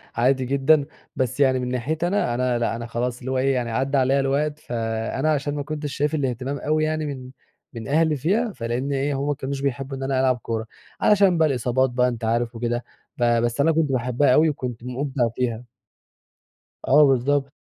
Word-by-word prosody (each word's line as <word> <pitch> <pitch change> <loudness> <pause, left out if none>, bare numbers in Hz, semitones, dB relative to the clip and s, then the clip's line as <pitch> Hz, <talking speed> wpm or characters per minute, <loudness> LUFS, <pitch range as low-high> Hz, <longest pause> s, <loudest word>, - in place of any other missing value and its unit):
عادي 130 +2 +2
جدًا، 140 +3 +3 0.3
بس 130 -1 -2
يعني 130 -2 +3
من 125 - -3
ناحيتي 150 +7 -1
أنا، 190 -10 0
أنا 125 -1 0
لأ، 115 -1 0
أنا 115 0 -5
خلاص 120 +1 -3
اللي 130 +1 -5
هو 130 - 0
إيه 135 +1 +2
يعني 120 -3 -2
عدّى 135 +4 0
عليَّ 135 +1 +3
الوقت، 145 +2 0
فأنا 115 +4 -2
علشان 145 -1 -1
ما 145 - -3
كنتش 150 -1 -5
شايف 150 +3 0
الإهتمام 135 -1 -2
أوي 155 +2 0
يعني 155 0 -1
من 130 -3 -6 0.4
من 115 -2 -7
أهلي 155 +2 +2
فيها، 205 - 0
فلأن 120 +3 -3
إيه، 140 +1 0
همّ 140 - -2
ما 145 - +1
كانوش 135 -1 -5
بيحبوا 135 0 -3
إن 135 - -5
أنا 135 -1 0
ألعب 130 -1 +2
كورة. 115 -2 -4 0.4
علشان 195 -4 +4
بقى 160 -1 +4
الإصابات 130 -1 +1
بقى 125 0 +2
أنت 120 -2 -4
عارف 115 +1 0
وكده، 120 +1 -2 0.3
فبس 120 +1 +1
أنا 160 +3 +4
كنت 155 -3 +1
باحبها 125 +1 +2
أوي 155 +3 +5
وكنت 125 -5 -5
مُبدع 125 -1 -1
فيها. 120 -2 -2 1.2
آه، 150 +3 +6
بالضبط. 135 +2 +1
135 Hz, 195 wpm, -23 LUFS, 120-145 Hz, 1.2 s, آه